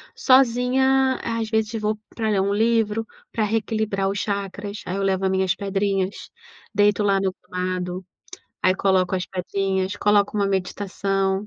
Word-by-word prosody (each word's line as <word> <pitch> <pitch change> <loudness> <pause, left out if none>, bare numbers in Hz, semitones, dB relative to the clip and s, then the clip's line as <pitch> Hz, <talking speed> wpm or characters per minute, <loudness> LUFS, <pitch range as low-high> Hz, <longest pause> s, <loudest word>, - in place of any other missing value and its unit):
Sozinha, 260 +1 +3
às 230 -1 -2
vezes 220 0 0
vou 215 0 0 0.2
para 220 -2 -1
ler 200 -2 +2
um 200 +1 0
livro, 225 0 +1 0.3
pra 220 - 0
reequilibrar 215 -2 0
os 200 +1 -2
chacras, 200 0 -4
aí 185 - -3
eu 195 - -1
levo 190 0 +1
as 190 - +2
minhas 190 -1 +1
pedrinhas, 195 -1 -2 0.4
deito 205 +1 +3
lá 195 -1 +3
no 190 -1 0
gramado, 180 0 -3 0.6
aí 185 0 +4
coloco 190 -1 +2
as 185 - -2
pedrinhas, 190 +1 -2
coloco 205 0 +2
uma 200 -1 +2
meditação, 195 +1 -1
200 Hz, 150 wpm, -23 LUFS, 190-220 Hz, 0.6 s, aí